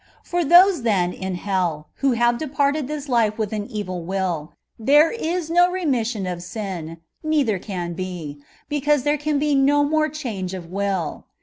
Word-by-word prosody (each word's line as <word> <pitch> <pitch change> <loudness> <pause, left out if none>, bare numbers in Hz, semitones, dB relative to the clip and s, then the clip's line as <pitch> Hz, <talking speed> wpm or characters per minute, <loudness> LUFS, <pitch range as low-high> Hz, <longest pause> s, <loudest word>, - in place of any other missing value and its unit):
For 350 0 -1
those, 350 +1 +6
then, 190 -6 +1
in 190 -1 -4
hell, 175 -5 -2
who 275 -2 +2
have 240 0 +2
departed 285 -1 0
this 300 -1 -5
life 230 -5 +2
with 220 -1 -2
an 210 -1 -3
evil 200 -6 -4
will, 175 -4 -2 0.3
there 295 +8 +5
is 345 -6 -2
no 350 +1 +5
remission 250 - -1
of 180 -1 -4
sin, 180 -4 -6 0.3
nei 310 -2 +2
ther 215 -6 -1
can 180 -3 -4
be, 170 -5 -6 0.3
because 295 -2 +1
there 295 +1 +1
can 300 0 0
be 295 +1 +1
no 280 +1 +4
more 310 +1 +1
change 215 -11 -4
of 180 -2 -7
will. 195 -4 -2
230 Hz, 175 wpm, -22 LUFS, 185-295 Hz, 0.3 s, those